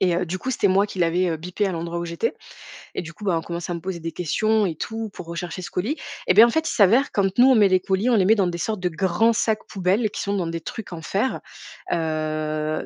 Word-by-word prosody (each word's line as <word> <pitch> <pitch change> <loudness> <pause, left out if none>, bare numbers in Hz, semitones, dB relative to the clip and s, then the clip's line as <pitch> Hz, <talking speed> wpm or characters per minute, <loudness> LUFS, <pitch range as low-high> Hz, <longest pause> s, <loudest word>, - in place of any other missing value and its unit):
et 180 -3 +2
heu, 180 - 0
du 185 +3 -3
coup, 260 - -3
c'était 230 -5 +2
moi 195 +2 +3
qui 195 - -9
l'avais, 175 +2 +2
heu, 165 - -1
bipé 180 +6 -2
à 190 - -2
l'endroit 170 0 -4
où 170 - -3
j'étais 170 +7 -2 0.6
et - - -1
du 170 -1 -9
coup, 210 - -13
bah, 180 -4 +2
on - - -2
commençait 170 +1 -5
à - - -1
me - - -5
poser 185 -1 -4
des 165 0 -5
questions 215 +6 +1
et 170 -4 -2
tout 225 +6 -4
pour 180 - -9
rechercher 170 0 -5
ce - - -7
colis 225 - -2 0.3
et - - +5
bien, 220 +5 +8
en - - +1
fait, 320 +3 0
il - - -2
s'avère 235 +5 +4
quand 195 0 0
nous 250 - +8
on 260 - +6
met 210 -3 +6
les 185 0 +4
colis, 195 +6 0
on 240 - +4
les 195 -4 +3
met 220 +4 +5
dans 195 -4 +2
des 175 -1 -3
sortes 215 +3 -2
de 180 - 0
grands 190 +7 +2
sacs 220 -1 0
poubelles 195 +4 0
qui - - -5
sont 200 0 -1
dans 180 -4 -1
des 165 0 -4
trucs 200 +3 -7
en 165 - -7
fer, 200 +10 -1 0.5
heu, 155 -1 -2
185 Hz, 285 wpm, -23 LUFS, 170-215 Hz, 0.6 s, bien